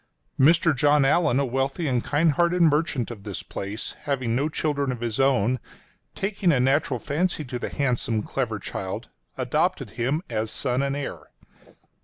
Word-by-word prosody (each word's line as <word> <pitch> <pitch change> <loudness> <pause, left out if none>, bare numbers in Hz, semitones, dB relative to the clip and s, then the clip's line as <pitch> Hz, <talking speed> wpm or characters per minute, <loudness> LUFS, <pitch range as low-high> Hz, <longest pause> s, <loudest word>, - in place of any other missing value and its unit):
Mr. 160 +3 +5
John 145 +1 +4
Allan, 140 -2 +3
a 140 - +2
wealthy 135 +6 -1
and 125 -3 +1
kind 150 +2 +2
hearted 175 +3 +2
merchant 150 -6 +2
of 110 -4 -8
this - - -6
place, 100 +3 -5
having 130 -5 0
no 140 +5 +1
children 145 -3 -1
of 125 - -5
his 115 -1 -2
own, 130 -2 +3 0.6
taking 195 -2 +1
a 135 - +2
natural 135 +1 +2
fancy 155 +4 -1
to 125 -1 -5
the - - -3
handsome, 120 -5 0
clever 115 -4 -2
child, 95 -1 -5 0.3
adopted - - 0
him 135 +8 -1
as 110 -2 -2
son 125 +3 0
and 140 0 -1
heir. 145 -1 -5
135 Hz, 165 wpm, -25 LUFS, 120-150 Hz, 0.6 s, Mr